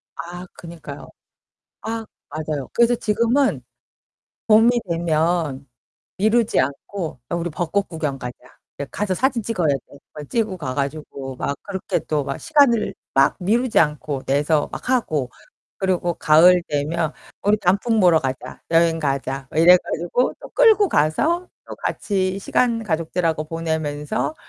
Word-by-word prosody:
아 175 +1 -7
그니까요. 170 -1 -10 0.8
아 225 0 -4 0.2
맞아요. 155 -3 -4
그래서 235 +1 +4
지금은 235 +5 +1 0.8
봄이 225 +2 +6 0.2
되면 165 -4 0 0.5
미루지 215 - +2
않고 140 +2 -4
"야, - - +1
우리 170 0 -2
벚꽃 180 +5 -1
구경 150 -5 -3
가자. 125 -1 -6 0.5
야, - - -1
가서 200 -3 -1
사진 250 +1 0
찍어야 185 -8 -1
돼." 140 0 -3 0.2
막 150 -2 -8
찍으러 220 -5 -1
가 130 -6 -4
가지고 140 -2 -4
막 140 +2 -2
그렇게 190 -2 -2
또 150 -3 -2
막 140 - -4
시간을 250 -10 +3 0.2
막 135 0 +4
미루지 230 +6 +2
않고 150 -3 0
내서 145 +2 +1
막 - - -7
하고 155 - 0 0.5
그리고 180 -3 0
가을 175 +3 +5
되면 155 +2 -1 0.3
"우리 205 +1 +3
단풍 205 +4 +2
보러 175 -3 +5
가자. 130 -1 -5
여행 165 0 +3
가자." 135 -2 -2
이래 170 +3 +7
가지고 175 +8 -1
또 - - -10
끌고 440 -5 +5
가서 315 - +1 0.2
또 - - -7
같이 190 -1 -1
시간 230 +3 +1
가족들하고 165 -3 -1
보내면서 155 -3 -2
170 Hz, 275 characters per minute, -21 LUFS, 150-210 Hz, 0.8 s, 이래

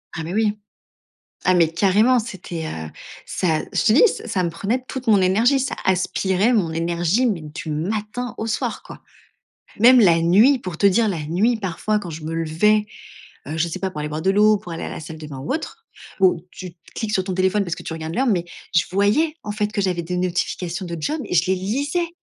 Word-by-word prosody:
Ah 160 - -4
mais 170 - -5
oui. 215 0 +1 0.9
Ah 185 - +5
mais 170 -2 +4
carrément 210 +8 +3
c'était, 180 -7 -6
heu, 80 - -6 0.4
ça 160 -4 0
je - - +1
te 220 - +5
dis, 275 - +6
c 315 - -5
ça 185 -4 0
me 170 - 0
prenait 210 +9 -2
toute 260 -1 -6
mon 205 -3 +5
énergie. 225 +9 +3
Ça, 270 - -2
aspirait 190 +3 +1
mon 180 -8 +1
énergie 170 +8 +1
mais 185 -8 -1
du 155 +1 -7
matin, 210 +9 -3
au 225 - -3
soir 220 - -2
quoi. - - -12 0.8
Même 250 +3 +8
la 170 -6 +5
nuit, 215 +11 +5
pour 180 -6 -6
te 200 - +4
dire 215 +3 +3
la 175 -6 -2
nuit 205 +10 +1
parfois 210 +2 -1
quand 175 -5 -7
je 155 0 -8
me 160 - -4
levais, 165 +7 +2 0.6
heu, 155 - -4
je 170 - +2
sais - - -6
pas 190 -1 -1
pour 150 - -8
aller 150 - -3
boire 155 +1 -4
de 190 - +2
l'eau, 210 +2 +5
pour 175 - -11
aller 165 - -5
à - - -4
la - - -6
salle 160 0 -9
de 155 - -8
bain 140 -3 -8
ou 145 - -3
autre, 390 +9 -5 0.4
où, 180 -3 +4
tu 185 -2 -8 0.2
cliques 220 -2 -3
sur 190 -3 +1
ton 185 - -3
téléphone 190 +2 +1
parce 170 -2 -3
que - - -10
tu - - -6
regardes 160 0 -5
l'heure 265 +2 +1
mais 180 -6 +1 0.3
je 165 - +4
voyais, 215 - +2
en 210 - -6
fait 210 0 -2
que 210 - -1
j'avais 180 -3 0
des 180 +2 -4
notifications 180 0 -2
de 170 -1 -5
jobs 300 - -2
et - - -4
je 165 - +4
les 190 - +2
lisais! 285 - -2
190 Hz, 230 wpm, -21 LUFS, 170-215 Hz, 0.9 s, Même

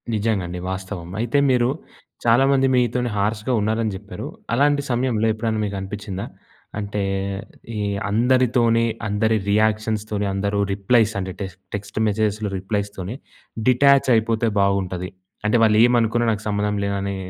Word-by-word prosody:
నిజంగా 105 -2 0
అండి. 90 +1 -5
వాస్తవం. 95 -2 -6
అయితే 120 +4 0
మీరు 125 -1 +3 0.6
చాలామంది 135 +3 +4
మీతోనే 125 0 +1
హార్ష్‌గా 105 +4 0
ఉన్నారని 110 +1 0
చెప్పారు. 100 +1 -7 0.3
అలాంటి 145 +3 +3
సమయంలో 120 -3 +1
ఎప్పుడైనా 110 0 -2
మీకు 100 -1 -4
అనిపించిందా, 95 0 -5 0.5
అంటే, 100 0 -3 0.8
ఈ - - -1 0.3
అందరితోని 120 0 +3 0.2
అందరి 110 +2 +1
రియాక్షన్స్ 110 0 +1
‌తోని, 105 -1 -1
అందరూ 100 +1 -1
రిప్లైస్ 105 +2 +2
అంటే, 95 -1 -4
టెక్ 95 -3 -5 0.2
టెక్స్ట్ 100 +1 -5
మెసేజెస్‍లో 105 0 0
రిప్లైస్‌తోనే 100 +1 -4 0.5
డిటాచైపోతే 125 -4 +4
బాగుంటది. 95 -2 0 0.4
అంటే, 110 - +3
వాళ్ళు 105 -1 +4
ఏమనుకున్నా 120 -1 +2
నాకు 105 -1 -4
సంబంధం 105 0 0
లేదని 100 0 -2
110 Hz, 125 wpm, -22 LUFS, 100-120 Hz, 0.8 s, చాలామంది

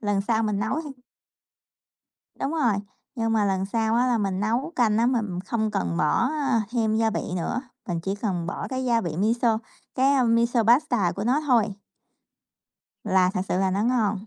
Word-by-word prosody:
lần 205 -2 0
sau 220 +2 0
mình 210 -2 -1
nấu 270 +9 -1
thì 270 -4 -10 1.4
Đúng 275 - -2
rồi, 275 -9 +2 0.4
nhưng 225 -3 -1
mà 220 -2 +2
lần 190 -1 0
sau 220 +2 0
á 245 +2 +3
là 245 -2 +2
mình 195 -2 -1
nấu 240 +10 -1
canh 220 -4 +3
á 235 - +3
mình 215 -8 -1
không 215 +3 -2
cần 85 - -2
bỏ 235 - +2 0.4
thêm 225 -3 0
gia 225 0 +2
vị - - -2 0.2
nữa, 245 +9 -2 0.3
mình 170 -2 -2
chỉ 195 +2 -2
cần 190 -5 -3
bỏ - - -4
cái 260 -1 -3
gia 235 -2 +2
vị 170 -7 -4
miso, 225 +3 +2 0.4
cái 270 0 +3
miso 235 0 +2
paste 240 - +3
của 200 - -3
nó 260 +5 +2
thôi. 240 -5 +4 1.4
là 190 -3 +3
thật - - 0
sự 180 - 0
là 190 -1 +1
nó 195 +2 0
ngon. 215 -4 0
220 Hz, 190 wpm, -25 LUFS, 195-245 Hz, 1.4 s, thôi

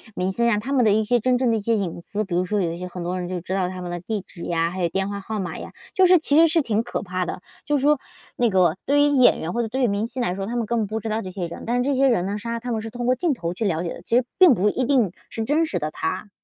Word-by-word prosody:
明 185 +1 -1
星 235 +5 0
呀， 235 -3 +3
他 245 +6 -5
们 255 -4 +3
的 215 - +5
一 220 +1 +2
些 240 +3 +2
真 250 +2 +2
正 250 -2 +2
的 225 - +2
一 - - -2
些 225 +2 +1
隐 180 -5 -3
私， 210 +4 -3
比 190 - -6
如 180 +1 +1
说 205 +2 0
有 170 -2 0
一 170 - -6
些 180 - -5
很 180 -1 -7
多 180 +2 -2
人 180 - -4
就 180 -1 -4
知 185 +2 -5
道 190 -2 +1
他 185 0 -6
们 175 -1 -5
的 175 - -4
地 205 +4 -3
址 170 - -11
呀， 165 0 0
还 185 +1 -5
有 175 - +2
电 195 +3 -1
话 200 0 -4
号 215 +2 -5
码 190 -3 -4
呀， - - -8 0.2
就 380 - +5
是 365 0 +7
其 295 -2 +2
实 330 +1 +7
是 325 +1 +2
挺 220 -5 0
可 240 - -4
怕 185 -2 -3
的。 180 - -5 0.2
就 295 - +1
是 - - -2
说 295 0 +3 0.4
那 240 -1 +3
个 185 -3 +3
对 285 +1 +3
于 - - +6
演 255 -3 +5
员 165 - -3
或 240 - -1
者 230 - -2
对 260 +4 -1
于 - - +4
明 205 +1 -1
星 245 +1 -3
来 180 -6 -1
说， 195 0 -4
他 235 +4 -4
们 235 -2 0
根 235 +2 0
本 215 - -1
不 220 +2 -3
知 225 - -4
道 220 +1 -1
这 185 - -6
些 180 -2 -4
人， 170 - -9
但 240 - +1
是 245 - +1
这 280 +1 +1
些 270 +1 +4
人 210 -9 +2
呢， 200 +2 -2
是 210 - -8
让 235 0 -2
他 245 +1 -4
们 220 -2 -1
是 225 - -6
通 245 +1 -5
过 250 - +4
镜 300 +5 0
头 170 -8 -4
去 220 +5 -3
了 170 -4 0
解 170 - -3
的， - - -11
其 230 - -1
实 255 - +3 0.2
并 365 -6 +8
不 210 -2 +2
一 255 +4 -1
定 245 -8 +2 0.2
是 225 - -4
真 300 +7 +2
实 205 - -3
的 155 -1 -3
他。 185 +7 -3
215 Hz, 385 characters per minute, -23 LUFS, 185-245 Hz, 0.4 s, 并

